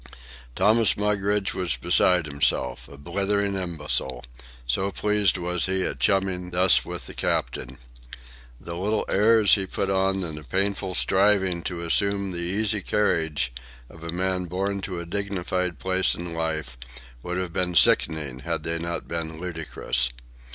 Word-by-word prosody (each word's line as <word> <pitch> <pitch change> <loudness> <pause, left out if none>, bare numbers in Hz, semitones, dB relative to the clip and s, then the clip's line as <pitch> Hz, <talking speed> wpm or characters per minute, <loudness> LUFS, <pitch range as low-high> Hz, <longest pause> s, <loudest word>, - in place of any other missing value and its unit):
Thomas 110 +3 +4
Mugridge 105 -1 0
was 90 -7 -1
beside 90 +7 +4
himself, 70 -4 0
a 70 - -13
blithering 100 +6 -1
imbecile, 75 -9 -2 0.4
so 80 +11 0
pleased 105 -2 +1
was 90 0 -1
he 95 0 0
at - - -3
chumming 95 -3 0
thus 90 +1 +4
with - - -6
the - - -8
captain. - - -2 0.8
The 85 - -7
little 105 +5 -1
airs 110 +1 +5
he 95 -2 +2
put 95 +1 -2
on 95 0 +1
and 80 -3 -5
the - - -13
painful 95 +3 -1
striving 95 -3 +3
to 85 -2 -4
assume 100 +3 +1
the 85 - -4
easy 100 +4 0
carriage 80 -12 0 0.4
of 80 - -14
a 85 - -6
man 90 +1 -1
born 95 +3 -2
to 90 -2 -4
a 85 - -6
dignified 90 -2 -2
place 95 +2 +1
in 85 0 -6
life 80 -7 -3 0.4
would 90 +4 -4
have 90 -2 -3
been 90 -1 -1
sickening 75 -5 +3
had 75 - -3
they 85 +1 -2
not 85 +1 -4
been 80 -1 -4
ludicrous. 80 -7 0
90 Hz, 150 wpm, -25 LUFS, 80-100 Hz, 0.8 s, airs